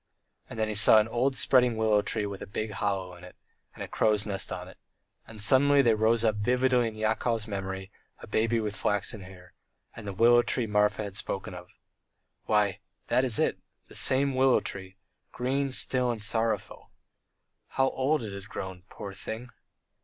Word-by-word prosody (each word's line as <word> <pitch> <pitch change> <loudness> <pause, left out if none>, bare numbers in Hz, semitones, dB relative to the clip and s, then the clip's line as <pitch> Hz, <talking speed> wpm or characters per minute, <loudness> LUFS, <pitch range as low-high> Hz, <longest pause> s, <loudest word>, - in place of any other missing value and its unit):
And - - -9
then 110 -1 0
he 110 - -3
saw 105 +1 +7
an 110 0 +3
old 125 +4 0
spreading 125 -4 +3
willow 110 -2 +2
tree 105 - -2
with 100 -1 -7
a - - -7
big 110 +2 -4
hollow 95 -3 -3
in 90 - -16
it, 90 - -13 0.4
and - - -7
a - - -6
crow's 105 -1 +1
nest 100 -3 -3
on 90 0 -6
it.... - - -15 0.5
And 110 -1 -12
suddenly 140 +6 +5
there 115 -3 +3
rose 110 +1 +2
up 110 -2 +1
vividly 125 +2 +1
in 110 - -7
Yakov's 110 +1 -1
memory 95 -1 -5 0.3
a - - -11
baby 115 +1 0
with 105 -2 -3
flaxen 105 +1 -2
hair, 90 -1 -14 0.4
and 110 -2 -9
the 100 - -4
willow 120 +4 +5
tree 120 0 -1
Marfa 105 0 +1
had 100 -2 -7
spoken 95 -1 -5
of. 90 0 -10 0.8
Why, 105 -3 +1 0.3
that 125 +2 +2
is 125 -5 +2
it, - - 0 0.3
the - - -14
same 135 +1 +2
willow 130 0 +3
tree 95 -1 -8 0.3
green, 135 +3 -1
still, 130 -1 +1
and 120 -2 -2
sorrowful.... 110 +1 -1 0.8
How 135 0 0
old 135 +1 0
it 105 -3 -6
has 100 0 -9
grown, 95 -3 -7
poor 100 -2 -8
thing! 110 +5 -7
110 Hz, 185 wpm, -28 LUFS, 100-120 Hz, 0.8 s, saw